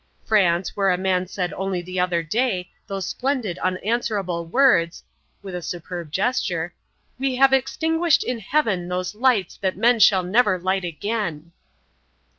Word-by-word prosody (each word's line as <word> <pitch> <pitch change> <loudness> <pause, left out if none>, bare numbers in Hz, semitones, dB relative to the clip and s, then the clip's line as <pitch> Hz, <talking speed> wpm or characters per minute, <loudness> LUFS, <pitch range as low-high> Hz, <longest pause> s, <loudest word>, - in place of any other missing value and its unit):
France, 180 -4 +2
where 195 -1 +2
a 180 - +2
man 185 -1 0
said 180 -1 -3
only 190 -1 -2
the 180 +1 -5
other 180 -2 +1
day 190 0 -1 0.2
those 195 -2 -4
splendid 250 -9 -2
unanswerable 185 -3 -1
words" 180 -7 +3 0.4
with 190 -2 -7
a 180 - -4
superb 175 -1 -6
gesture 180 -5 -1 0.5
"'we 265 -1 0
have 270 +1 +5
extinguished 320 +3 +2
in 245 -2 -3
heaven 210 -7 0
those 180 +1 -3
lights 220 -5 +1
that 190 -2 -2
men 235 +2 +3
shall 190 -3 +5
never 205 +1 +3
light 190 +1 -1
again.'" 170 -2 -3
190 Hz, 145 wpm, -23 LUFS, 180-235 Hz, 0.5 s, have